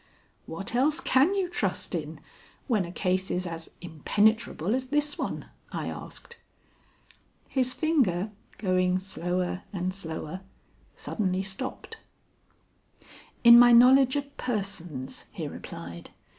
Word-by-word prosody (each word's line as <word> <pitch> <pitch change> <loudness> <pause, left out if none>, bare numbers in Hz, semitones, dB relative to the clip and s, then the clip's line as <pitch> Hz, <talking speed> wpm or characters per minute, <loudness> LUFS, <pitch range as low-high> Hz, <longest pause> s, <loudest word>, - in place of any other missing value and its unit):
"What 195 +7 -6
else 285 +5 +2
can 280 +10 +3
you 385 -2 0
trust 350 - -2
in, - - -4 0.5
when 215 -8 +1
a 170 - -8
case 185 0 0
is 180 +1 -1
as 165 -1 -6
impenetrable 205 +3 +1
as 260 0 -1
this 295 +2 0
one?" - - -4 0.2
I - - -3
asked. 470 - -9 1.1
His 255 -2 +1
finger, 220 - +1 0.3
going 185 -2 +1
slower 180 -1 -2
and 185 -1 -2
slower, 165 -1 -6 0.5
suddenly 190 -3 -2
stopped. 195 +7 -6 1.5
"In 235 0 +10
my 240 0 +8
knowledge 260 +2 +7
of 285 0 -4
persons," 180 - -3
he - - -4
replied. 85 0 -9
195 Hz, 115 wpm, -27 LUFS, 180-260 Hz, 1.5 s, In